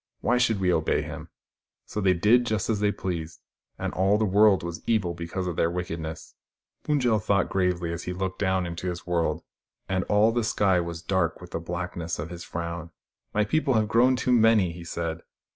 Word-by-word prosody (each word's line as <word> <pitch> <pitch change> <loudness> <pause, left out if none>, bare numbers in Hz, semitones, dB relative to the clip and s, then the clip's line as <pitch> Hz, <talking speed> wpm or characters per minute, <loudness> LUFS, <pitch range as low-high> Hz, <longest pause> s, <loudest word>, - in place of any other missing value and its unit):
Why 125 +1 +2
should 115 -4 +2
we 90 -2 +2
obey 80 -1 +1
him? - - -8 0.3
" - - -66
So 105 - -4
they 95 -2 +3
did 120 +7 +4
just 110 0 0
as 105 - 0
they 105 0 +2
pleased, 85 -4 -5 0.4
and - - -3
all 95 +2 +3
the 110 - +1
world 100 -1 +4
was 85 0 -5
evil 100 -7 +1
because 85 +2 -4
of 90 -2 -3
their 85 - +2
wickedness. 85 -2 -5 0.5
Pund 150 -2 +1
jel 115 -3 +3
thought 100 -2 +1
gravely 90 -3 0
as 85 - -6
he - - -3
looked 95 +1 -3
down 95 -2 +1
into 85 +1 -5
his 85 -1 -6
world, 85 -2 0 0.4
and 95 -1 0
all 105 +2 +4
the 120 0 0
sky 100 -4 +2
was 85 -1 -5
dark 95 -4 0
with 90 -1 -12
the - - -2
black 85 +2 -5
ness 85 -1 -3
of 80 +3 -5
his 85 -1 -7
frown. 85 0 -5 0.2
" - - -53
My 105 0 +3
people 140 +2 +1
have 110 -1 +2
grown 125 +4 +4
too 125 - 0
many," 110 -6 +4
he 85 +1 -9
said. 85 -1 -4
90 Hz, 215 wpm, -26 LUFS, 85-105 Hz, 0.5 s, did